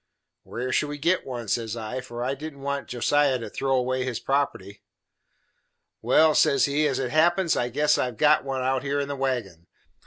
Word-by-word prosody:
"Where 125 +2 -5
should 150 - +1
we 145 - -5
git 170 +4 0
one?" 120 -3 -5
says 115 +1 -2
I, 115 +3 -5
for 120 -1 -6
I 130 +2 -1
didn't 140 0 -8
want 140 -1 -3
Josiah 135 +2 +1
to 115 -4 -8
throw 135 -1 0
away 130 0 0
his 125 -3 -3
property. 135 -8 -2 1.2
"Well," 155 +7 +4
says 145 -3 +4
he, 150 +2 +1
"as 135 -3 -1
it 130 -2 -2
happens, 170 +3 +3
I 120 - -1
guess 145 +4 +2
I - - +2
have 125 -3 -6
got 150 0 +4
one 135 -1 -3
out 130 0 0
here 140 +1 -1
in 140 - -2
the 140 - -4
wagon. 120 -11 -3
135 Hz, 205 wpm, -25 LUFS, 125-145 Hz, 1.2 s, Well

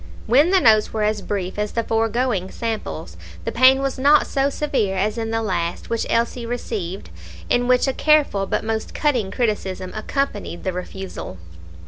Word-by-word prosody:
When 280 +9 +4
the 380 0 +5
notes 215 -7 +4
were 215 -1 -1
as 210 -1 0
brief 195 -1 -3
as 210 0 -2
the 230 - 0
foregoing 225 -3 0
samples, 85 - -5 0.3
the - - -1
pain 260 +2 +5
was 270 -1 -2
not 290 +3 +5
so 275 0 +1
severe 265 -10 -1
as 210 +3 0
in 225 -1 -3
the 225 0 -1
last 175 -3 -2
which 230 - -1
Elsie 235 +1 0
received, 210 - -4 0.4
in 245 0 +2
which 250 +2 +3
a 270 - +1
careful 290 -12 +3
but - - -1
most 220 0 -3
cutting 250 -10 +1
criticism 190 -4 -2
accompanied 215 -5 -3
the 185 - -2
refusal. 180 - -7
225 Hz, 170 wpm, -21 LUFS, 195-255 Hz, 0.4 s, the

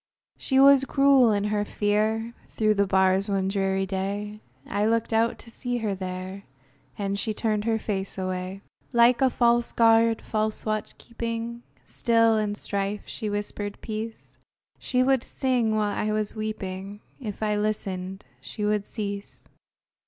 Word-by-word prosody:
She 265 -1 +1
was 275 0 +7
cruel 275 -3 +5
in 205 -1 +1
her 210 0 0
fear; 215 +3 0 0.2
Through 215 -1 +2
the 200 -1 +1
bars 190 +1 +3
one 195 -1 0
dreary 195 -1 0
day, 200 +2 -4 0.2
I 205 +1 -1
looked 225 +1 +1
out 225 +1 +2
to 230 - -12
see 245 +1 -3
her 215 -4 -1
there, 185 +1 -6 0.5
And 200 -1 -2
she 215 +1 -2
turned 215 -2 0
her 225 -1 +2
face 195 -3 -3
away! 185 +1 -4 0.3
Like 235 +1 +5
a 265 - +5
false 235 -1 +2
guard, 225 0 +4
false 215 0 -1
watch 215 -1 -3
keeping, 235 0 -5 0.2
Still, 230 -2 +3
in 210 -1 -1
strife, 200 0 -2
she 215 -3 -4
whispered 205 0 -4
peace; 220 +1 -6 0.4
She 255 0 +1
would 265 -1 +2
sing 245 -5 0
while 210 -1 +1
I 215 - -1
was 215 0 -1
weeping; 205 -2 -5 0.2
If 220 -4 -5
I 210 -1 +1
listened, 195 -2 -3 0.2
she 210 - -4
would 210 -1 0
cease. 200 -2 -6
215 Hz, 150 wpm, -26 LUFS, 200-230 Hz, 0.5 s, was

